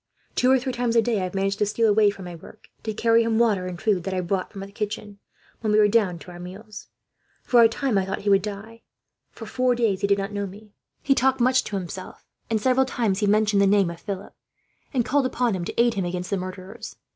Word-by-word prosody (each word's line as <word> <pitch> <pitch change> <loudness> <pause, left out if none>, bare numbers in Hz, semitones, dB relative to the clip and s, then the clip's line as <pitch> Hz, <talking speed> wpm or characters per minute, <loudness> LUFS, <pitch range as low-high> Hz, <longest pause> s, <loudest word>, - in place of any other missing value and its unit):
Two 250 - +2
or 265 - +6
three 260 0 -3
times 240 -1 -1
a 230 - +6
day 230 -3 0
I - - -1
have 185 - -6
managed 195 +1 0
to 210 - +3
steal 225 +2 +1
away 210 0 +4
from 195 -2 -7
my 175 - -7
work, 170 +5 -14
to 220 - -3
carry 230 +2 +3
him 225 -1 0
water 210 -6 +2
and 180 -1 -6
food 200 -5 +1
that 190 -1 -2
I 185 - 0
brought 185 +1 -2
from 195 - -8
the 195 0 -8
kitchen, 205 -1 -5 0.4
when 215 -2 -1
we 210 - +4
went 210 -1 +4
down 200 -7 +2
to 170 +3 -12
our 175 - -10
meals. 195 +5 -10 0.6
For 240 -2 +5
a 225 - +7
time, 230 -2 0
I 190 - -1
thought 195 - -3
he 205 - -1
would 195 0 +5
die; 210 +3 -7 0.5
for 225 - -10
four 250 +2 +1
days 215 -5 0
he 200 - +1
did 200 0 +3
not 200 +1 -4
know 200 -1 -2
me. 205 +2 -13 0.3
He 275 - +4
talked 265 0 +2
much 255 +1 +3
to 205 - -4
himself 185 0 -7 0.2
and, 225 -1 +1
several 260 +3 +2
times, 220 -7 0
he 210 - +1
mentioned 210 0 +3
the 200 - +4
name 195 -3 +3
of 170 - -11
Philip, 195 -2 -6 0.6
and 245 -4 0
called 280 -1 +2
upon 245 -3 0
him 175 -2 -4
to - - -5
aid 235 0 +4
him 195 -4 -2
against 180 0 -4
the 200 - +1
murderers. 185 +1 -8
210 Hz, 260 wpm, -24 LUFS, 195-230 Hz, 0.6 s, a